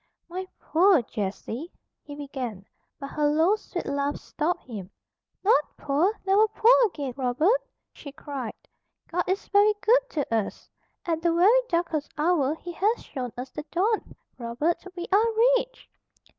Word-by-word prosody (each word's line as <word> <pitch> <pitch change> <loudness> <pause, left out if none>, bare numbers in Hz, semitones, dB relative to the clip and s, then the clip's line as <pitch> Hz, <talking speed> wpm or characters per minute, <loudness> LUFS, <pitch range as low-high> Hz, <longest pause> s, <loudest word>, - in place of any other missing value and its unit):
"My 370 +2 -5
poor 350 -3 +4
Jessie," 220 - -5 0.3
he 290 - -10
began, 255 -9 -6 0.3
but 275 -1 -7
her 300 -1 +1
low, 320 +7 +3
sweet 385 -4 -6
laugh 280 +1 -1
stopped 345 +3 -2
him. 205 -7 -8 0.5
"Not 390 -7 +5
poor! 295 +8 +2
Never 400 +3 +5
poor 440 +3 +5
again, 285 -9 -5
Robert!" 280 - +2 0.3
she 285 - -10
cried. 275 -5 -6 0.6
"God 355 0 0
is 380 +2 -1
very 415 +1 +5
good - - +3
to 290 - -2
us. 220 -3 -2 0.4
At 325 -3 -1
the 340 0 +2
very 390 +9 +5
darkest 335 -4 -1
hour 305 -2 +2
He 350 +2 -8
has 415 +7 0
shown 250 -4 -5
us 250 +1 -6
the - - -5
dawn. 410 +5 0 0.2
Robert, 245 +8 -1
we 350 -1 -4
are 425 +3 +5 0.3
rich!" - - -9
320 Hz, 150 wpm, -26 LUFS, 275-385 Hz, 0.6 s, Not